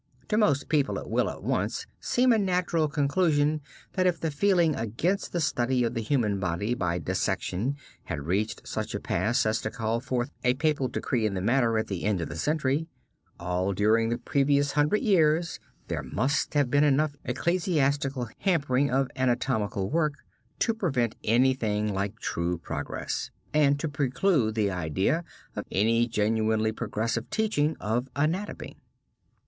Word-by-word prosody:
To 210 - +1
most 175 -11 +2
people, 145 -3 +1
it - - -6
will, - - +2
at - - -8
once, - - -1
seem 250 0 +3
a 225 - +3
natural 180 -4 +1
conclusion, 150 +1 +1 0.3
that 185 -1 +2
if 180 - +1
the 160 - -1
feeling 170 +1 +3
against 120 - -1
the 175 - -1
study 130 -4 +1
of 115 - 0
the 115 - -2
human 110 -4 0
body 95 +5 -1
by 90 -7 -1
dissection 100 - -1 0.3
had 80 -5 -4
reached 100 +6 -1
such - - -3
a - - -2
pass 110 +8 0
as 110 +1 +1
to - - -2
call 115 0 -1
forth 125 +1 -2
a 125 0 +3
papal 150 -2 +1
decree 115 -3 -1
in 100 - -3
the - - -1
matter, 115 +2 +2
at 110 - 0
the 95 -3 -4
end 105 -3 +1
of 85 - -3
the - - -6
century, 150 - 0 0.5
all 90 +2 -1
during 110 +3 +3
the 120 - 0
previous 140 +1 +1
hundred 150 - +2
years, 165 - +2 0.3
there - - -2
must 135 +7 -1
have 140 -4 +2
been 145 +1 +4
enough 145 +1 +2
ecclesiastical 140 -3 0
hampering 145 -7 +2
of 135 +1 +2
anatomical 120 -6 0
work 155 -2 +2 0.4
to 225 - +1
prevent 130 - 0
anything 110 -3 +2
like 100 +2 -2
true 85 -4 -2
progress, 85 - -4 0.2
and 145 -2 +3
to 160 - -1
preclude 140 - +1
the 105 -3 +1
idea 90 - 0 0.3
of - - -3
any 115 +4 +3
genuinely 110 0 +1
progressive 115 +1 -2
teaching 160 -9 0
of 120 +5 -1
anatomy. 165 +8 -2
130 Hz, 160 wpm, -27 LUFS, 110-150 Hz, 0.5 s, been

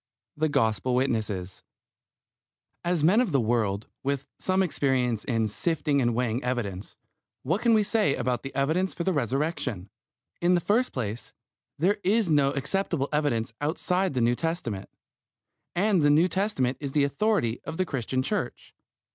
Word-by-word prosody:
THE 155 +1 +1
GOSPEL 125 -2 +1
WITNESSES 110 -8 -1 1.2
As 170 -3 0
men 195 +9 +5
of 245 - 0
the 140 - +3
world, 110 -3 0 0.2
with 140 0 -2
some 190 0 +2
experience 130 - 0
in 115 -4 0
sifting 150 - 0
and 120 -2 +1
weighing 120 0 -1
evidence, 105 -7 -3 0.5
what 170 - 0
can 235 -2 +4
we 215 - +4
say 205 -9 +2
about 125 -1 -1
the 135 - -8
evidence 160 +8 0
for 170 - -2
the 190 - +1
Resurrection? 130 - -2 0.5
In 175 +1 +4
the - - +3
first 225 +8 +1
place, 115 -2 -5 0.4
there 190 +7 +2
is 205 -2 +2
no 145 -2 +4
acceptable 145 0 -1
evidence 120 -7 0
outside 180 +3 0
the 125 - +1
New 120 +1 +3
Testament, 160 - -3 0.9
and 195 0 +3
the 145 - +4
New 155 +5 +5
Testament 180 -9 0
is 140 -2 -5
the 145 - +3
authority 140 - 0
of 160 - -6
the 185 - +1
Christian 130 -3 -2
Church. 210 +9 -3
140 Hz, 155 wpm, -27 LUFS, 120-180 Hz, 1.2 s, men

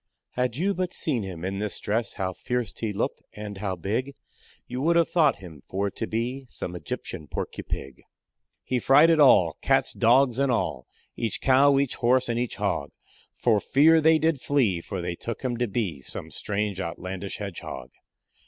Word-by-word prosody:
"Had 125 -2 -1
you 195 +5 +1
but 180 -1 -2
seen 135 -8 0
him 90 -3 -6
in 95 +1 -3
this 105 -1 -3
dress, 110 +3 -1
How 95 -2 -3
fierce 125 +4 -3
he 110 -2 -3
looked 100 - -2
and 105 -2 -7
how 95 -2 -2
big, 115 +10 -3 0.5
You 125 +1 -5
would 170 +4 +3
have 170 -1 +3
thought 155 -5 +4
him 85 -7 -12
for 100 +1 -1
to 110 +3 -4
be 125 +4 -3
Some 90 - -6
Egyptian 75 -1 -6
porcupig. 65 -2 -5 0.6
He 125 - -1
frighted 155 +6 +5
all 95 - +6
cats, - - +2
dogs, 125 +1 +4
and 140 -1 +2
all, 75 - -1 0.3
Each 115 -3 -2
cow, 140 +1 +5
each 140 -2 +1
horse, 125 +1 +2
and 115 0 0
each 120 -1 -2
hog; - - -1 0.5
For 110 -4 +3
fear 160 +8 +5
they 160 +1 +5
did 160 -3 +1
flee, 115 -12 +1
for 95 +1 -5
they 90 0 -2
took 115 +8 -6
him 125 -2 -1
to 120 0 0
be 95 - -2
Some - - -6
strange 105 -2 -2
outlandish 95 +3 -5
hedgehog." 95 - -7
115 Hz, 180 wpm, -26 LUFS, 95-135 Hz, 0.6 s, all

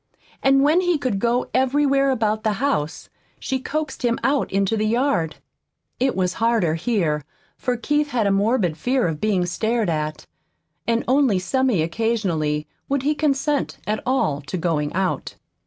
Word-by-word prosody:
And 270 0 +4
when 310 +5 +4
he 355 -3 +2
could 250 -8 -1
go 240 +3 +1
everywhere 275 +1 +3
about 220 -4 0
the 215 - +1
house 205 - -1 0.3
she 265 0 -2
coaxed 300 +2 -4
him 235 -1 +2
out 280 +1 +1
into 195 +2 +1
the 215 0 0
yard. 235 - +1 0.6
It 260 +1 +1
was 185 -1 0
harder 225 -8 +2
here, 165 - 0 0.3
for 250 -1 -2
Keith 295 +5 0
had 240 -5 0
a 200 - +3
morbid 195 -4 +1
fear 250 +4 +1
of 155 -2 -4
being 200 -4 +1
stared 220 +2 0
at. 155 -1 -3 0.6
And 230 0 +1
only 260 -5 +3
semi 205 0 +1
occasionally 165 -6 -1 0.2
would 275 -1 0
he 295 +2 +2
consent 295 -1 0
at 215 +1 -1
all 155 - 0
to 185 - -3
going 160 -4 -1
out. 190 0 -2
230 Hz, 160 wpm, -22 LUFS, 180-270 Hz, 0.6 s, And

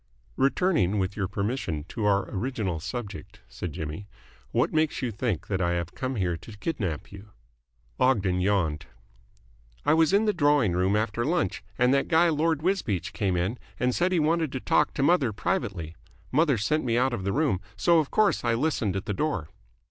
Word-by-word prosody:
"Returning, 135 - +2
with 95 0 -1
your 95 -3 -1
permission, 100 - -2
to 110 -3 -3
our 100 -1 +2
original 105 - -2
subject," 105 +2 -7
said 90 - -6
Jimmy, 80 +4 -6 0.4
"what - - +1
makes 155 -3 +1
you 120 - -1
think 110 -5 -2
that 95 -2 -2
I 85 0 +1
have 85 -1 -3
come 130 0 -3
here 90 -5 0
to 105 +5 -12
kidnap 100 - -3
you?" 100 +2 -11 0.7
Ogden 95 -8 +2
yawned. 90 -6 0 1.0
"I 150 - +4
was 160 +1 +4
in 205 +3 +3
the 210 - +2
drawing 145 - +3
room 95 +3 +2
after 110 +2 0
lunch, 145 - 0
and 125 +2 +4
that 140 - +2
guy 170 +1 +4
Lord 160 0 +1
Wisbeach 105 - -1
came 100 -4 0
in 95 +8 -1 0.2
and 125 +1 +1
said 180 +6 +1
he 180 - +2
wanted 160 -1 +1
to 130 - -2
talk - - +1
to 135 - 0
mother 145 -6 +3
privately. 95 - -2 0.4
Mother 150 -2 +3
sent 150 +10 0
me 120 -2 +1
out 130 +1 +2
of 100 - -3
the 100 - 0
room, 140 - +1 0.2
so 170 +10 +4
of 150 - -1
course 215 -2 +2
I 120 -1 +2
listened 115 - 0
at 95 +1 -3
the 105 - -2
door." 95 - -2
115 Hz, 190 wpm, -27 LUFS, 95-150 Hz, 1.0 s, I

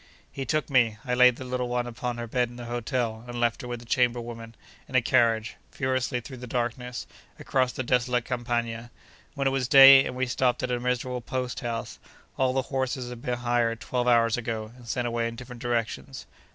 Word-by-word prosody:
He 135 - -5
took 155 +1 0
me 120 -6 +3
(I 125 - -1
laid 125 0 +6
the 130 - -8
little 125 0 -2
one 120 0 0
upon 120 0 -4
her 120 - -4
bed 120 +1 0
in 120 - -12
the 120 0 -8
hotel, 120 -1 -2
and 120 0 -5
left 120 -1 +1
her 125 - -7
with 120 -1 -5
the - - -13
chamber 120 0 +2
women), 115 -1 -8 0.3
in 130 - -8
a 130 - +6
carriage, 115 -3 +2
furiously 130 -2 -1
through 130 +2 -10
the 125 0 -8
darkness, 125 +1 -3 0.3
across 130 -2 0
the 130 - -4
desolate 125 -1 +1
Campagna. 120 -2 -2 0.5
When 140 - -2
it 135 - +3
was 135 -2 0
day, 135 +1 +10
and 125 - -4
we 130 +1 0
stopped 125 0 0
at 125 - -1
a 125 - 0
miserable 125 0 -2
post 125 0 -3
house, 115 -1 -5 0.4
all 130 -1 +2
the 130 0 0
horses 130 -1 -1
had 120 -1 -8
been 125 -3 -2
hired 120 -1 0
twelve 125 -1 -2
hours 115 -2 +4
ago, 110 -2 -4
and 125 -2 -15
sent 125 +1 -1
away 115 -1 -1
in 115 - -6
different 125 0 -10
directions. 120 +2 -3
120 Hz, 215 wpm, -27 LUFS, 120-125 Hz, 0.5 s, day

